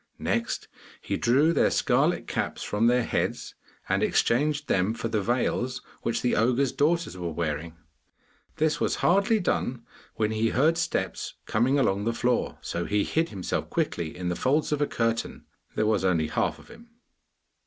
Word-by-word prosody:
Next - - -2 0.3
he - - -3
drew 145 +8 +3
their - - +3
scarlet - - +2
caps - - -3
from 110 +3 +1
their 125 0 +3
heads - - -2 0.3
and - - +1
exchanged 150 +4 +1
them 95 +4 +1
for 115 - -3
the 110 -2 0
veils 125 +3 -1 0.2
which 115 - -1
the 125 - +2
ogre's 125 +4 +2
daughters 165 - +1
were 90 -2 -4
wearing. 80 0 -3 0.8
This 155 0 +1
was - - +1
hardly 200 +4 +4
done 125 - -1 0.3
when 110 -1 0
he 110 +1 +1
heard 155 +8 +2
steps - - -2
coming 125 +6 +2
along 100 -6 +1
the 115 - +1
floor, 125 0 0
so 85 - -3
he 105 0 +1
hid 165 +1 0
himself 95 -4 -3
quickly 80 0 -2
in 90 -1 -3
the 90 - -1
folds 145 - +1
of 150 -1 0
a 145 - +2
curtain. 115 0 -2 0.3
There 110 - +1
was 105 -3 +1
only 85 -4 +1
half - - 0
of - - -17
him! 235 0 -15
120 Hz, 170 wpm, -27 LUFS, 105-145 Hz, 0.8 s, hardly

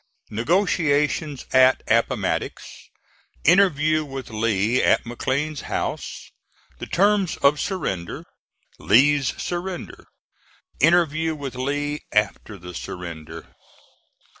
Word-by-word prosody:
NEGOTIATIONS 150 - 0
AT 130 0 +5
APPOMATTOX - - -1 0.5
INTERVIEW 155 -4 +4
WITH 135 -4 -8
LEE 110 +1 +1
AT - - +3
MCLEAN'S 135 +5 -2
HOUSE - - -4 0.5
THE - - -6
TERMS 200 -1 +2
OF 145 +1 +4
SURRENDER 100 - -3 0.5
LEE'S 135 +4 +3
SURRENDER 175 +1 -5 0.7
INTERVIEW 160 0 +3
WITH 140 -3 -6
LEE 145 +3 -2
AFTER 105 0 0
THE 90 0 -10
SURRENDER. 85 -2 -8
145 Hz, 90 wpm, -23 LUFS, 115-160 Hz, 0.7 s, AT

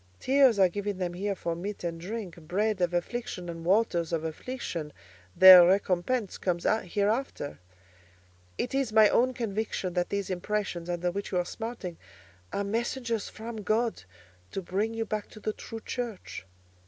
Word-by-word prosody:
Tears 265 -4 +4
are 190 -1 +6
given 205 +2 -3
them 180 -2 -2
here 200 +3 -2
for 170 -2 -3
meat 195 +4 -5
and 165 -1 -3
drink—bread 195 0 -2
of 175 -1 +2
affliction 180 +1 -3
and 165 -1 -6
waters 175 -3 +2
of 165 -1 -1
affliction—their 155 - +4
recompence 195 +4 +1
comes 175 -2 -1 0.2
hereafter. 205 - -1 1.0
It 250 - -2
is 270 -4 0
my 215 -1 +7
own 255 +1 +2
conviction 215 -5 -2
that 175 0 0
these 200 -1 -2
impressions 185 -2 -2
under 175 0 -1
which 200 +3 -5
you 185 - 0
are 180 - +1
smarting 225 -6 -6 0.5
are 200 - -1
messengers 230 +1 -2
from 225 +1 -7
God 220 - 0 0.5
to 195 - -5
bring 205 +6 -1
you 225 0 -1
back 215 -1 -4
to 215 - -12
the 215 0 -2
true 225 +1 -8
Church. 230 - -5
200 Hz, 155 wpm, -28 LUFS, 175-225 Hz, 1.0 s, my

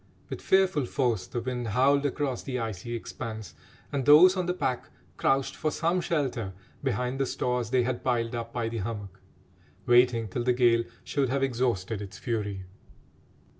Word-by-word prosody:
With - - -5
fearful 190 -8 +3
force 120 -10 0
the 120 - -3
wind 125 -1 -3
howled 140 +6 +3
across 135 -3 -2
the 130 -2 -4
icy 115 0 -4
expanse, 110 +1 -6 0.4
and 140 -2 -1
those 160 +7 +8
on 180 -2 -1
the 180 - +1
pack 130 -7 -2 0.3
crouched 135 0 +1
for 155 - -1
some 170 +4 0
shelter 135 - -1 0.3
behind 125 0 -1
the 135 - +1
stores 125 -2 -1
they 125 0 +3
had 125 0 -2
piled 120 -2 0
up 115 -1 -4
by 115 -1 -2
the 115 0 -4
hummock, 100 -2 -5 0.7
waiting 120 -2 +4
till 120 +5 -3
the 125 0 +3
gale 120 -2 +3 0.2
should 135 -3 0
have 135 +1 0
exhausted 115 -6 -1
its 100 -2 -8
fury. 105 -5 -3
125 Hz, 170 wpm, -28 LUFS, 115-135 Hz, 0.7 s, those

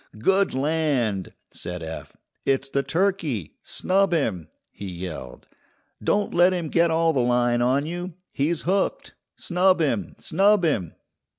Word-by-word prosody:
"Good 190 - +2
land!" 135 - 0 0.2
said 90 -1 -5
Eph; 80 0 -8 0.3
"it's 135 0 0
the 140 0 +1
turkey! 165 - -1
Snub 195 0 +1
him," 105 - 0 0.2
he 100 - -8
yelled. 85 -8 -7 0.6
"Don't 205 0 +1
let 175 +2 +5
him 170 -4 -2
get 170 +1 +3
all 165 0 +2
the 135 - +1
line 120 0 +2
on 130 +4 +2
you! 175 +1 -5 0.2
He's 155 +4 0
hooked! 190 +2 -1 0.2
Snub 185 +1 +2
him! 105 - 0
snub 200 0 +3
him!" 105 - -1
150 Hz, 135 wpm, -24 LUFS, 115-175 Hz, 0.6 s, let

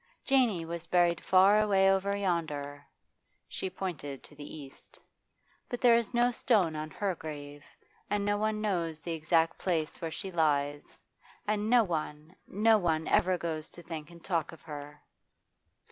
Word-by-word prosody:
Janey 240 -11 +2
was 170 0 -6
buried 175 -1 +2
far 195 +3 +5
away 195 -2 +3
over 195 +1 +1
yonder' 150 -7 -2 0.6
she 190 - -4
pointed 165 -7 -5
to - - -13
the 145 +1 -9
east 140 -3 -13 0.7
'but 245 - -3
there 245 -2 +6
is 230 -2 +2
no 240 0 +3
stone 205 -10 +2
on 155 0 -4
her 195 +3 -2
grave, 145 -3 -8 0.5
and 205 -1 0
no 205 0 +2
one 215 +1 0
knows 170 -6 -1
the 170 - -5
exact 165 +1 +1
place 165 -4 -2
where 165 - -2
she 190 +4 -6
lies, 145 -3 0 0.5
and 210 0 0
no 240 -1 +6
one, 155 -2 -4
no 215 +2 +4
one 160 -3 0
ever 185 0 +3
goes 160 -2 -4
to 175 - -13
think 160 -3 -7
and 170 -1 -15
talk 165 -5 -1
of 165 -3 -14
her. 145 -2 -9
170 Hz, 160 wpm, -30 LUFS, 155-200 Hz, 0.7 s, there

